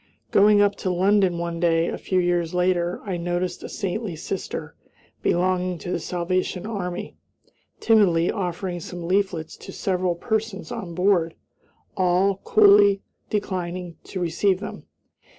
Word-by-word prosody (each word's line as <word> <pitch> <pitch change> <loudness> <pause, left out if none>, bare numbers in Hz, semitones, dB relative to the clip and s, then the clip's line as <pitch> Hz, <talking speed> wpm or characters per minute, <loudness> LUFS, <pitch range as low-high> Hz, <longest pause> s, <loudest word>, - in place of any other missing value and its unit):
Going 205 +1 +6
up 205 0 +3
to 185 - -2
London 190 0 +3
one 170 0 -3
day, 165 -1 +2
a - - -3
few 185 - -1
years 175 -1 0
later, 180 -1 +1
I 190 -3 -2
noticed 175 +1 -2
a - - -7
saintly 195 -1 -3
sister, 185 +4 -5 0.5
belonging 180 0 +1
to 175 - -6
the - - -1
Salvation 180 +1 -2
Army, 185 -5 -4 0.6
timidly 185 -7 +4
offering 180 -2 -3
some 175 0 -7
leaflets 185 -4 0
to - - -10
several 185 -2 -1
persons 220 +2 -3
on 195 -8 -6
board; 180 -3 +2 0.6
all 185 +1 +2
coolly 200 -1 +5 0.3
declined 180 -4 -3
to 190 - -5
receive 180 +2 +1
them. 210 - -8
185 Hz, 135 wpm, -24 LUFS, 175-200 Hz, 0.6 s, Going